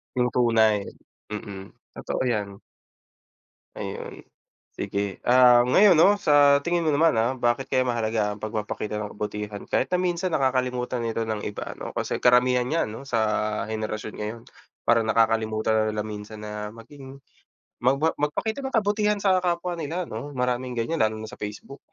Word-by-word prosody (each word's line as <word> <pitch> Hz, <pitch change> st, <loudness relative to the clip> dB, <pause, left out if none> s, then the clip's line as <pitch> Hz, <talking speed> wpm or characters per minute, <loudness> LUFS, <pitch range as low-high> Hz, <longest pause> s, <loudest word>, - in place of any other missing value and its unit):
Yung 125 Hz, -1 st, +2 dB
tunay, 110 Hz, -4 st, +3 dB, 0.5 s
mm. 100 Hz, -2 st, -7 dB, 0.2 s
Totoo -, -, -3 dB
'yan. 105 Hz, -5 st, -2 dB, 1.2 s
Ayun. 475 Hz, +1 st, -6 dB, 0.5 s
Sige, 100 Hz, -1 st, -3 dB
ah, 125 Hz, -1 st, +7 dB
ngayon 185 Hz, +10 st, +6 dB
'no, 200 Hz, +6 st, +5 dB
sa 145 Hz, -3 st, +5 dB
tingin 170 Hz, 0 st, +1 dB
mo 160 Hz, -, +1 dB
naman, 155 Hz, +3 st, +4 dB
ah, 115 Hz, +3 st, +2 dB
bakit 120 Hz, +2 st, 0 dB
kaya 130 Hz, 0 st, +2 dB
mahalaga 110 Hz, -3 st, 0 dB
ang 105 Hz, -, -16 dB
pagpapakita 105 Hz, -1 st, -3 dB
ng 105 Hz, -1 st, -5 dB
kabutihan, 105 Hz, 0 st, -5 dB
kahit -, -, +2 dB
na 180 Hz, -, +2 dB
minsan 180 Hz, 0 st, -1 dB
nakakalimutan 125 Hz, -2 st, 0 dB
ito 115 Hz, 0 st, -2 dB
ng 110 Hz, -2 st, -3 dB
iba, 105 Hz, -, -6 dB
'no. -, -, -6 dB
Kasi -, -, -2 dB
karamihan 125 Hz, 0 st, +4 dB
niyan 165 Hz, -5 st, 0 dB
ano, 125 Hz, +5 st, -9 dB
sa 115 Hz, -, 0 dB, 0.5 s
henerasyon 110 Hz, 0 st, -4 dB
ngayon, 105 Hz, +2 st, -5 dB, 0.4 s
parang 115 Hz, -1 st, +3 dB
nakakalimutan 110 Hz, -1 st, +1 dB
na -, -, +2 dB
nila 105 Hz, -, -1 dB
minsan 105 Hz, 0 st, -8 dB
na 105 Hz, -, -6 dB, 0.2 s
maging 135 Hz, +3 st, -12 dB, 0.6 s
magba 140 Hz, +6 st, +2 dB
magpakita 150 Hz, -, -1 dB
ng 265 Hz, -, -5 dB
kabutihan 210 Hz, -1 st, +1 dB
sa 190 Hz, -2 st, +4 dB
kapwa 175 Hz, 0 st, -1 dB
nila 165 Hz, +4 st, -3 dB
'no. 135 Hz, +7 st, -7 dB
Maraming 125 Hz, 0 st, -1 dB
ganyan 120 Hz, +8 st, -2 dB
lalo 110 Hz, 0 st, +2 dB
na 110 Hz, -, -7 dB
sa -, -, -12 dB
facebook. 105 Hz, +7 st, -7 dB
125 Hz, 160 wpm, -25 LUFS, 110-145 Hz, 1.2 s, ah